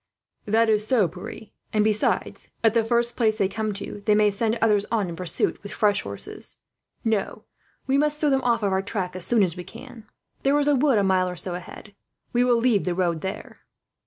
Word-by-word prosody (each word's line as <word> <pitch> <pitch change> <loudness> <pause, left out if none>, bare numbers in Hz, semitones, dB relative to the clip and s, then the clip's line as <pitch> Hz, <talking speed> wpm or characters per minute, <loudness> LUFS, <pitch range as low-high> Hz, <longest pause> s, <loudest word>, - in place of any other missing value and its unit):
"That 225 +2 +3
is 215 -1 +2
so, 225 -7 +3
Pierre; 185 +5 -9 0.2
and 215 -1 +2
besides, 215 0 0
at 225 -2 +4
the 230 -1 +3
first 235 +1 +1
place 220 -3 +1
they 195 - +2
come 215 +2 -2
to, 205 +1 -6
they 210 - +5
may 210 -1 +4
send 220 +3 -1
others 210 -3 +3
on 210 -6 0
in 170 - -6
pursuit 175 -1 -1
with 200 - -9
fresh 210 -3 +2
horses. 100 0 -7 0.5
No, 220 -3 -1 0.4
we 270 +1 +2
must 300 0 +1
throw 300 -2 +2
them 270 0 +2
off 235 -3 +1
our 190 -1 +1
track 190 -2 -3
as 185 - -2
soon 230 -4 +4
as 175 -3 0
we 180 - -6
can. 230 +1 -12 0.3
There 275 +2 +3
is 290 0 +2
a 295 - +4
wood, 275 -3 +3
a 205 - +3
mile 185 -1 +2
or 180 - -5
so 180 +1 -4
ahead; 180 +3 -9 0.4
we 245 0 +3
will 245 -1 +3
leave 230 -4 +2
the 180 -1 -1
road 170 -3 0
there." 190 +1 -6
215 Hz, 220 wpm, -24 LUFS, 190-235 Hz, 0.5 s, they